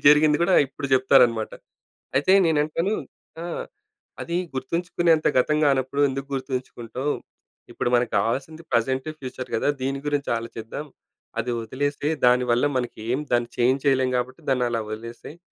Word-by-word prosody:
జరిగింది 150 0 +7
కూడా 185 +1 +3
ఇప్పుడు 140 +1 -6
చెప్తారనమాట. 125 -4 +4 0.6
అయితే 145 +7 +3
నేను 160 -2 +3
అంటాను 165 +7 -1 0.5
ఆహ్, 175 - -4 0.6
"అది 170 - -3 0.2
గుర్తుంచుకునేంత 165 +4 +1
గతం 150 +4 +3
కానప్పుడు 135 0 +1
ఎందుకు 135 +1 -4
గుర్తుంచుకుంటావు? 130 0 -3 0.6
ఇప్పుడు - - -1
మనకు 120 0 +1
కావాల్సింది 135 +10 -1
ప్రెజెంట్, 130 +4 +1
ఫ్యూచర్ 130 -1 -6
కదా! 115 - 0
దీని 135 +1 -1
గురించి 145 -1 -1
ఆలోచిద్దాం. 115 +4 -6 0.6
అది 120 +2 -3
వదిలేసేయి. 145 +6 -1
దాని 125 +1 +5
వల్ల 120 +4 +3
మనకి 125 -3 -3
ఏం 130 - 0
దాన్ని 120 -1 +2
చేంజ్ 130 +3 +2
చేయలేం 130 -2 +3
కాబట్టి 130 +1 -4
దాన్ని 125 -2 +2
అలా 115 -1 -1
వదిలేసేయి. 115 +8 -8
130 Hz, 140 wpm, -24 LUFS, 125-145 Hz, 0.6 s, జరిగింది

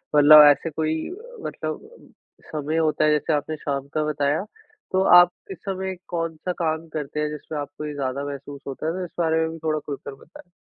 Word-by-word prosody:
मतलब 150 +1 +10
ऐसे 165 - -1
कोई 155 +1 -1
अ, 470 +6 -11
मतलब 435 - -5 0.6
समय 155 +1 -2
होता 155 -1 +2
है, 155 - +4
जैसे 150 +1 +1
आपने 150 +2 -1
शाम 140 -1 -3
का 155 -1 +1
बताया, 150 +2 0 0.5
तो 190 0 +2 0.2
आप 175 0 +5 0.2
इस - - -6
समय 190 -1 -3
कौन-सा 165 0 -3
काम 160 0 -1
करते 150 -1 -4
हैं, 150 0 0
जिसमें 150 0 -6
आपको 145 +1 -6
ये 150 - -4
ज़्यादा 140 0 -3
महसूस 140 0 -7
होता 135 +3 -5
है? - - +1
तो 185 0 -4
इस - - -12
बारे 160 -1 +2
में 160 0 0
भी 165 - -8
थोड़ा 155 -1 0
खुलकर 140 -1 -7
बताएँ। 175 +5 -16
155 Hz, 205 wpm, -24 LUFS, 145-165 Hz, 0.6 s, मतलब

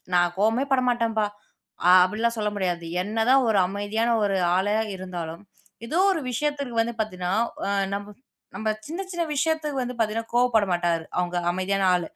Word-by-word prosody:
"நான் 175 0 +3
கோவமே 225 +6 +2
படமாட்டேன்ப்பா!" 235 -4 +1 0.8
அப்படி 210 +4 -3
எல்லாம் 235 0 +1
சொல்ல 210 -1 0
முடியாது. 175 -3 -1 0.2
என்னதான் 225 +6 +3
ஒரு 210 -3 +3
அமைதியான 210 +4 0
ஒரு 195 -1 +1 0.2
ஆளாயிருந்தாலும், 185 -4 -2 0.4
ஏதோ 315 +9 -1
ஒரு 325 - -2
விஷயத்துக்கு 280 -1 -2
வந்து 235 +1 -4
பார்த்தீங்கன்னா, 185 -3 -3 0.3
அ - - -1 0.2
நம்ப 205 0 -5 0.5
நம்ப 215 +3 -3 0.2
சின்ன 330 +5 -5
சின்ன 345 -1 -2
விஷயத்துக்கு 305 -1 0
வந்து 250 0 -4
பார்த்தீங்கன்னா 225 0 -1
கோபப்பட 240 -4 +3
மாட்டாரு. 170 -2 0
அவங்க 180 0 -1 0.2
அமைதியான 190 +1 0
ஆளு. 175 -2 -3
215 Hz, 150 wpm, -25 LUFS, 185-245 Hz, 0.8 s, நான்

